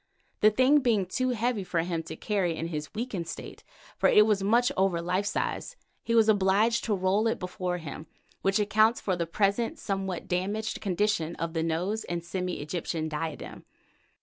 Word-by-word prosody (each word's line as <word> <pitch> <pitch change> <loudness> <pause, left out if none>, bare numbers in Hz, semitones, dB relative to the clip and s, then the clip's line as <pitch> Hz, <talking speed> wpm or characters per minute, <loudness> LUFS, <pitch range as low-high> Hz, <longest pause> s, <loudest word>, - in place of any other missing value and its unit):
The 215 - +6
thing 255 +7 +4
being 230 -7 +2
too 255 +8 -1
heavy 235 -3 0
for 175 -2 0
him 170 -1 -2
to 160 - -5
carry 190 -3 -1
in 165 - -3
his 150 -2 -5
weakened 210 -7 -3
state, - - -8 0.4
for - - +4
it 210 +1 +6
is 210 -2 +2
much 235 +5 +3
over 190 -2 +2
life 185 +4 -1
size, - - -2 0.3
he 230 - -1
was 225 -1 +5
obliged 210 +3 +3
to 215 - +1
roll 195 +4 +1
it 225 - 0
before 180 -1 -3
him, 155 -1 -8 0.3
which 195 +1 +2
accounts 215 +2 +3
for 190 - -1
the 170 -1 -2
present 200 +6 0
somewhat 195 -3 -3
damaged 205 +5 -2
condition 195 -4 0
of 165 0 -4
the 165 - 0
nose 175 +7 -1
and 170 -1 -3
semi 180 -1 -3
Egyptian 160 0 -3
diadem. 155 0 -5
195 Hz, 180 wpm, -28 LUFS, 170-215 Hz, 0.4 s, The